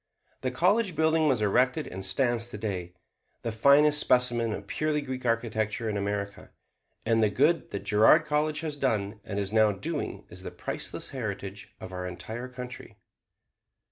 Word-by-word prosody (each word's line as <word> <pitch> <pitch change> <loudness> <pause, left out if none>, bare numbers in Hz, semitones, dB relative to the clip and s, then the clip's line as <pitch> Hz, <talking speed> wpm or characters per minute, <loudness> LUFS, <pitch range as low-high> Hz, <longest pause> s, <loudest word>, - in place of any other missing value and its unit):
The 130 - 0
college 185 - +2
building 160 0 +3
was 125 -7 +2
erected 125 +8 +2
and 95 +1 -7
stands 120 +1 +1
today, 100 -6 -5 0.5
the 115 - -2
finest 140 +6 +5
specimen 120 -4 +3
of 100 -1 -5
purely 155 +6 -1
Greek 130 -2 -5
architecture 115 -1 -1
in 105 - -1
America; 100 0 -3 0.6
and 115 0 +3
the 110 - +4
good 150 +10 +2
that 100 - -5
Girard 110 +10 +5
College 150 +1 0
has 155 -2 -3
done 110 -7 -1
and 100 - -5
is 100 0 -2
now 110 -1 +5
doing 145 - -4
is - - -10
the - - -6
priceless - - -5
heritage 100 -6 -6
of 95 - -9
our 90 0 -4
entire 115 +7 -6
country. 125 -1 -9
120 Hz, 160 wpm, -28 LUFS, 105-145 Hz, 0.6 s, finest